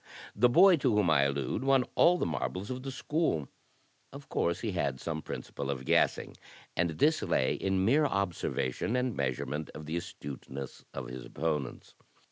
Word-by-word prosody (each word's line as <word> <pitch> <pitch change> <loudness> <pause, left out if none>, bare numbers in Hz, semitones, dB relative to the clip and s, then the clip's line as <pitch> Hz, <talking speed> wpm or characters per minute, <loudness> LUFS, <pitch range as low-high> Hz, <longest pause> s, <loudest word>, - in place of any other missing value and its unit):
The 120 +4 +5
boy 180 +6 +7
to 130 -6 +1
whom 100 -6 +3
I 70 -3 +4
allude 70 - -1
won 135 -2 +4
all 180 +1 +5
the - - -1
marbles 95 +6 -3
of 130 0 -4
the 135 - -5
s^ool. 135 - -1 0.6
Of 140 +1 -11
course 85 +1 0
he 110 - -2
had 70 -8 -1
some 80 +1 -3
principle 70 -1 -6
of 65 -2 -3
guessing; - - +2 0.4
and 85 0 +2
this 155 - +3
lay 65 - +1
in 95 -1 0
mere 145 +7 +4
observation 100 - -1
and 125 -1 0
admeasurement 70 +3 -2
of 75 - -8
the 80 +3 -2
astuteness 70 -4 -7
of 70 - -5
his 60 0 -7
opponents. 75 +1 -3
85 Hz, 170 wpm, -30 LUFS, -, 0.6 s, boy